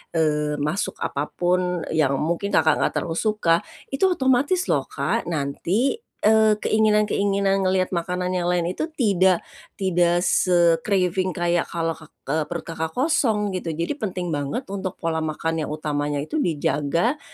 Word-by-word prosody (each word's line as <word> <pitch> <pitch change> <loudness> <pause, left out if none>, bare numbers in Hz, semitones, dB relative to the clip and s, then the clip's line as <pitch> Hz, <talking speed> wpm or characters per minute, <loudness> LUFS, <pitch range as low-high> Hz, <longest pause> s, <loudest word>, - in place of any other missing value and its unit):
eee, 150 -2 +1
masuk 150 +6 -2
apa 145 +1 -2
pun 180 -1 0
yang 150 -4 +2
mungkin 170 +7 -1
Kakak 155 -1 +3
nggak - - +1
terlalu 165 -1 -2
suka, 210 -6 +2 0.3
itu 275 +8 +2
otomatis 285 +1 +2
loh - - 0
Kak, - - -2
nanti, 175 - -1 0.2
eee, 220 0 +5
keinginan-keinginan 205 -2 +2
ngelihat 185 0 +1
makanan 180 +1 -2
yang 180 -1 -1
lain 175 -1 +1
itu 310 - -3
tidak 190 - +3 0.3
tidak 175 -2 +2
se-craving 180 +1 +2
kayak 175 -1 0
kalau 165 -1 -2
kak 160 -1 -10 0.2
eee, 155 0 +1
perut 170 +1 -5
Kakak 160 -1 -4
kosong, 240 -8 +1
gitu. 175 -4 -3
Jadi 170 - -2
penting 180 -5 -3
banget 145 - -2
untuk 190 -2 -4
pola 165 -1 -2
makan 160 +1 -2
yang - - -7
utamanya 145 -1 -2
itu 310 - -3
dijaga, 165 - 0
175 Hz, 150 wpm, -23 LUFS, 160-200 Hz, 0.3 s, eee